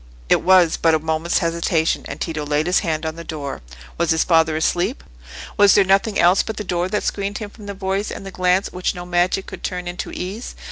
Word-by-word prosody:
It - - +4
was 185 -3 +5
but 165 -1 +3
a - - +3
moment's 160 +2 -1
hesitation, 165 -1 0
and - - -7
Tito 155 -3 -3
laid 150 +1 0
his 180 +1 +3
hand 160 -2 -2
on 160 +1 -4
the 170 - -7
door. 145 -4 -6 0.4
Was 170 - +1
his 160 0 +3
father 160 -2 +3
asleep? 175 - 0 0.5
Was 205 -1 +6
there 200 - +6
nothing 195 +2 +2
else 180 +3 +5
but 220 - -6
the 210 - -3
door 180 -1 -1
that 210 - -1
screened 200 0 -2
him 210 -2 -7
from 210 -2 -13
the 200 - -5
voice 195 +1 -2
and - - -7
the 195 - -7
glance 185 +1 +1
which 180 +1 -2
no 175 0 -7
magic 180 +2 +1
could 190 - -9
turn 180 -1 -4
into 175 0 -5
ease? 195 +7 -6
180 Hz, 230 wpm, -20 LUFS, 165-195 Hz, 0.5 s, Was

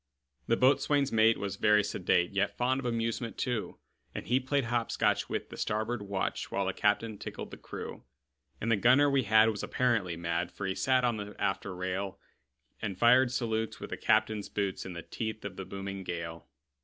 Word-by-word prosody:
The 115 - +3
boatswain's 140 +1 +3
mate 115 0 +4
was 100 -1 -4
very 105 0 +4
sedate, 90 -3 +1
Yet 100 0 0
fond 130 +2 +1
of 130 - -3
amusement, 115 0 -2
too; 120 -4 -2 0.4
And - - -5
he 125 +2 +2
played 135 +2 0
hop 115 0 0
scotch - - +1
with - - -3
the - - -9
starboard 110 +2 -1
watch, 100 -1 -3
While 100 0 0
the 95 - -1
captain 105 +1 0
tickled - - -7
the - - -8
crew. - - -8 0.6
And 115 - -1
the 110 - +4
gunner 130 +7 +5
we 135 -1 +3
had 110 +1 +5
was 105 - -5
apparently 110 -9 0
mad, 85 +1 -2
For 100 - -6
he 95 - 0
sat 130 +4 +2
on 120 -2 +1
the 105 0 -7
after 95 -1 -2
rail, 95 +2 -3 0.6
And 100 -4 -3
fired 125 +2 +5
salutes 110 -3 -2
with - - -8
the - - -1
captain's 105 -2 +1
boots, 100 -2 -2
In 90 - -6
the 85 - -7
teeth 110 -2 -5
of 100 -2 -5
the 95 - -6
booming 95 0 -6
gale. 85 -2 -5
110 Hz, 195 wpm, -30 LUFS, 95-120 Hz, 0.6 s, gunner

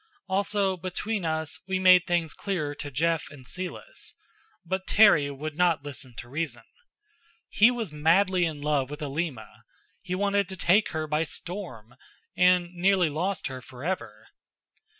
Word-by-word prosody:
Also, 195 0 +1
between 185 +3 -3
us, 160 -1 -2
we 190 0 0
made 185 -1 +6
things 170 -3 0
clearer 170 -8 -3
to 145 0 -7
Jeff 165 +4 0
and 140 -3 -13
Celis. 185 - -5 0.5
But 190 +2 -3
Terry 195 -9 +6
would 145 +2 -6
not 170 -3 +2
listen 130 -4 -7
to 120 - -8
reason. 155 +4 -4 0.9
He 220 +3 +6
was 235 -8 -3
madly 175 +4 +3
in 155 -3 -4
love 145 -3 0
with 150 +1 -6
Alima. 135 -7 -4 0.4
He 180 -1 -3
wanted 200 0 +1
to 190 - -5
take 185 +4 +3
her 155 -1 -3
by 150 0 0
storm, 165 - -6 0.4
and 180 -1 +3
nearly 180 -1 +3
lost 185 +6 -2
her 130 -2 -5
forever. 130 +9 -5
170 Hz, 150 wpm, -27 LUFS, 145-190 Hz, 0.9 s, made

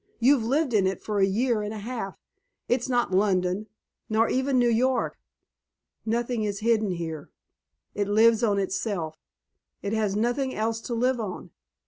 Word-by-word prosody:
You've 255 0 +4
lived 270 +3 +1
in 200 -3 +4
it 190 -1 -2
for 210 -1 -2
a 195 - +4
year 225 +3 +1
and 210 0 -4
a 220 - -5
half. 220 -2 -5 0.5
It's 245 +1 0
not 245 -5 +1
London, 185 +1 +1 0.4
nor 220 +1 +3
even 265 +1 +1
New 245 -1 +4
York. 250 +3 +1 0.9
Nothing 235 0 0
is 205 0 -3
hidden 220 -2 +2
here. 160 -3 -5 0.6
It 205 -1 -1
lives 225 +2 +4
on 205 -3 +2
itself; 185 -5 -2 0.6
it 200 - -2
has 215 -3 0
nothing 245 +5 0
else 225 +1 -1
to 235 - -4
live 250 +2 +1
on. 205 -5 -5
220 Hz, 160 wpm, -26 LUFS, 200-240 Hz, 0.9 s, You've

